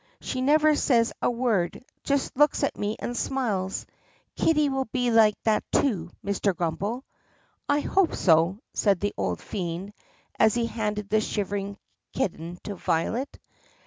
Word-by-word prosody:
She 255 - -3
never 305 +3 +4
says 235 -5 +2
a - - +2
word 235 -4 0
— - - -48
just 280 -1 0
looks 295 +2 +3
at - - 0
me 210 +1 -2
and 245 - -4
smiles. 215 -8 -1 0.5
Kitty 305 -2 +3
will 270 -1 -1
be 245 +1 0
like 220 -2 +5
that 220 -1 +2
too, 190 - +1 0.2
Mr. 200 -1 0
Grummbel." 185 +9 -2 0.7
"I 290 +1 +3
hope 380 +2 +2
so." 165 +2 +3 0.2
said 200 -4 +2
the 205 +2 -1
old - - -2
fiend 185 +1 -4 0.5
as 220 - +5
he 235 -1 +1
handed 210 -3 -3
the 215 0 +4
shivering 200 -1 -3 0.4
kitten 170 -1 -3
to 205 - -4
Violet. 190 +9 -1
215 Hz, 150 wpm, -26 LUFS, 195-255 Hz, 0.7 s, like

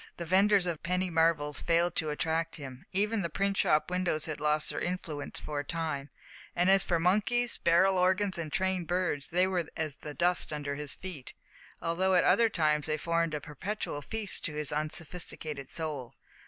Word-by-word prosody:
The 170 - -4
vendors 195 +2 +4
of 170 -3 -2
penny 180 +2 -1
marvels 160 -3 +2
failed 170 0 +2
to 155 - 0
attract 160 +2 -1
him. 135 -3 -9
Even 210 +3 +1
the 170 - -2
print 195 +4 0
shop 155 +3 +2
windows 180 -4 0
had 155 -2 -5
lost 150 0 +1
their - - -3
influence 170 -5 -4
for 150 -1 -4
a - - -2
time; 150 -3 -3 0.5
and 180 +2 +4
as 195 -1 +6
for 170 -2 +1
monkeys, 215 +7 +2
barrel 190 +3 +4
organs, 185 +1 +2
and 155 -2 -4
trained 190 -1 0
birds, 175 -6 -1
they 180 +2 +3
were 180 -4 -1
as 155 -2 -2
the 150 -1 -8
dust 175 -1 +2
under 145 -1 -3
his 145 0 -3
feet, 180 -8 -8 0.5
although 185 +3 +2
at 175 - +5
other 230 -1 +5
times 155 -5 +1
they 155 0 0
formed 165 0 0
a - - -2
perpetual 150 +2 -5
feast 215 +4 -3
to 155 - -3
his 150 -1 -1
unsophisticated 155 -2 -4
soul. 145 -6 -4
165 Hz, 185 wpm, -30 LUFS, 150-185 Hz, 0.5 s, as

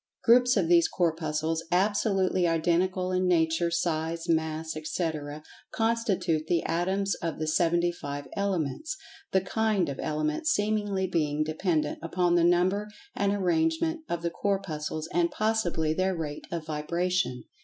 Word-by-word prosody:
Groups 245 +1 +5
of 180 -4 +2
these 170 -1 +5
Corpuscles, 160 -1 -1
absolutely 190 -1 +2
identical 175 +3 +1
in 185 0 +1
nature, 165 -1 +2
size, 165 0 -1
mass, 160 -1 -1
etc., 155 -2 -3 0.3
constitute 225 -9 0
the 170 -1 +1
Atoms 190 +4 0
of 165 -1 -3
the 155 - -2
Seventy 170 +2 +2
five 145 -4 -6
Elements, 200 - -2 0.3
the 190 - +3
"kind" 205 -3 0
of 140 - -5
Element 155 - -1
seemingly 205 -5 +1
being 155 -4 0
dependent 155 -1 -1
upon 175 +1 +1
the 175 -1 +4
number 180 +4 +2 0.3
and 200 0 +1
arrangement 175 - +1
of 170 0 -2
the 170 - -1
Corpuscles, 160 -6 -2
and 170 -1 +2
possibly 185 -8 0
by - - -10
their 190 0 +1
rate 150 -3 -5
of 170 -2 -3
vibration. 165 -2 -1
170 Hz, 140 wpm, -28 LUFS, 160-190 Hz, 0.3 s, Groups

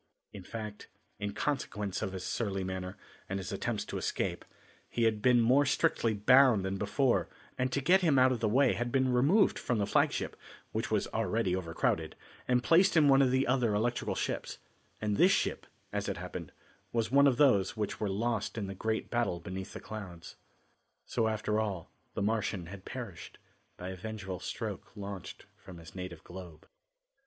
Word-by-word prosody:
In 100 - -8
fact, 105 +2 -7 0.3
in 105 -1 -3
consequence 105 -9 -2
of 95 - -2
his 95 -2 -5
surly 100 -3 -2
manner, 95 0 -5 0.3
and 95 - -1
his 95 -3 -5
attempts - - -2
to - - -4
escape, - - -2 0.5
he 120 - -1
had 110 -2 +2
been 125 0 +5
more 125 +5 +5
strictly 115 -5 +1
bound 120 -1 +5
than 95 +1 -2
before 105 - +1 0.3
and 130 0 -1
to 140 - 0
get 185 +7 +5
him 155 -6 +3
out 130 0 +6
of 125 - -1
the 110 -1 +1
way 130 +4 +4
had 120 0 -2
been 130 -1 +2
removed 150 - +4
from 120 - -1
the 105 - +1
flagship, - - +1 0.4
which - - -2
was - - +1
already 105 -5 0
overcrowded, 85 -3 -1 0.3
and 125 -1 +2
placed 175 +4 +5
in 150 -2 +6
one 135 0 +6
of 135 - +4
the 130 +1 +2
other 120 -4 +2
electric 120 +3 0
ships, - - -3 0.4
and 105 -1 -1
this 185 - +6
ship - - 0 0.3
as - - -1
it - - -3
happened - - -6 0.4
was 115 0 0
one 140 +1 +6
of 130 -3 +3
those 110 -8 +4
which 105 -2 -2
were 105 - -1
lost 110 +2 -1
in 105 - -2
the 95 - -5
great 110 +3 -2
battle 120 -7 0
beneath 95 +3 -6
the - - -6
clouds. 95 -6 -8 0.7
So 115 -2 0
after 110 0 0
all, 100 -6 -3 0.2
the - - -1
Martian 105 -4 -1
had 95 +2 -10
perished, 115 -9 -7 0.4
by 90 - -6
a 95 - -5
vengeful 95 -1 -6
stroke - - -6
launched 100 -2 -7
from 90 -2 -12
his 80 -2 -12
native 90 -3 -7
globe. 85 -3 -11
110 Hz, 185 wpm, -31 LUFS, 95-125 Hz, 0.7 s, out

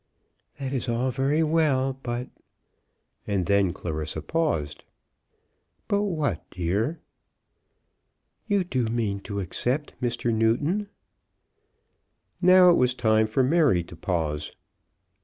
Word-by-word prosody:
"That 135 -1 -4
is 130 -2 -1
all 120 +3 0
very 140 +5 +1
well, 140 -5 +1
but, 120 0 -4 0.5
" - - -45
And 100 -4 0
then 100 -2 +3
Clarissa 80 -2 -4
paused. 80 - -1 1.0
"But 200 0 +1
what, 155 - -1
dear?" 100 - -1 1.5
"You 200 -3 +2
do 130 -9 -1
mean 110 -3 -1
to 100 0 -5
accept 125 - -2
Mr. 120 -1 -1
Newton?" 145 - +1 1.5
Now 180 0 +7
it 170 - +4
was 125 -1 +2
time 110 -2 +3
for 120 +5 +1
Mary 140 - +3
to 85 - -12
pause. 80 -5 -2
120 Hz, 115 wpm, -25 LUFS, 100-150 Hz, 1.5 s, Now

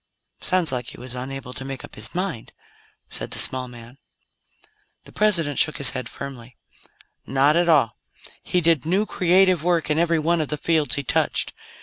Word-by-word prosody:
"Sounds 185 -5 +1
like 125 -2 -3
he - - -8
was 125 0 -7
unable 130 0 -6
to 130 - -7
make 135 -1 -6
up - - -18
his 110 +7 -3
mind," 180 -10 -4 0.5
said - - -4
the - - -1
small 130 -1 +4
man. 120 +2 -13 1.0
The - - -15
President 170 -9 +2
shook 155 - +2
his 140 -2 +1
head 130 -3 -5
firmly. 130 -3 -9 0.7
"Not 135 +3 +3
at 175 0 +2
all. 140 -8 +3 0.4
He 180 - 0
did 165 -4 +2
new, 190 +6 +1
creative 185 -3 +3
work 170 -3 +1
in 150 - +2
every 170 -1 +2
one 165 +2 +1
of 155 - -2
the 150 - -2
fields 155 -5 +1
he 140 - -3
touched. - - 0
150 Hz, 185 wpm, -23 LUFS, 130-170 Hz, 1.0 s, small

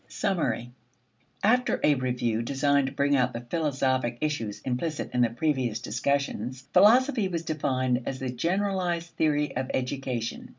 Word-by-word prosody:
Summary. 125 -10 -1 0.7
After 245 +4 +3
a 150 - +5
review 125 -4 -1
designed 140 +2 +1
to - - -4
bring 140 0 +2
out 125 -1 +2
the 120 +1 -6
philosophic 130 -6 0
issues 115 -9 -2
implicit 145 +5 -3
in 125 - +2
the 120 - +4
previous 125 -3 0
discussions, 130 -1 -2
philosophy 230 +3 +5
was 170 -3 -3
defined 130 -5 0
as 135 - -2
the 130 -1 -3
generalized 175 +3 -1
theory 150 -2 0
of 130 +1 -2
education. 125 -3 -3
135 Hz, 140 wpm, -27 LUFS, 125-160 Hz, 0.7 s, a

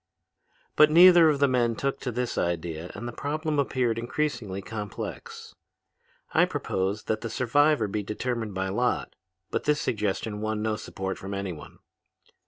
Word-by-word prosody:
"But 150 - +7
neither 170 0 +8
of 150 - +2
the 140 0 +4
men 120 -3 +1
took 135 +4 -2
to 125 - -3
this 125 +1 -2
idea 85 -1 -2
and 120 +4 -6
the - - -4
problem 150 +3 -2
appeared 125 -4 0
increasingly 120 -6 -2
complex. 105 0 -7 0.8
I - - +5
proposed 95 +3 -2
that 110 0 -1
the 115 - -4
survivor 130 +1 +2
be 105 +1 -2
determined 110 0 -3
by 95 0 -1
lot, 120 +6 -1 0.4
but - - -2
this 150 0 +2
suggestion 105 0 -2
won 110 0 -2
no 110 -1 0
support 95 -3 -5
from 100 +1 -5
anyone. 90 -7 -6
115 Hz, 155 wpm, -27 LUFS, 100-135 Hz, 0.8 s, neither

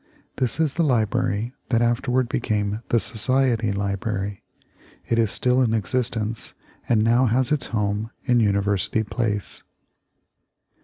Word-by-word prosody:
This 130 +3 +1
is 155 -4 +2
the 170 - +1
library 110 -3 0 0.2
that 120 -2 +2
afterward 125 +1 +1
became 105 -3 -1
the 115 - +3
Society 115 -1 +1
Library. 100 0 -3 0.7
It 115 - +1
is 110 -2 +3
still 125 +4 +2
in 115 -3 +2
existence, 115 0 -2 0.3
and 110 -3 +3
now 120 +3 +4
has 125 +3 +1
its 150 -3 +1
home 105 0 -1
in 120 -1 +3
University 100 0 +1
Place. 105 -2 -3
115 Hz, 125 wpm, -23 LUFS, 105-125 Hz, 0.7 s, now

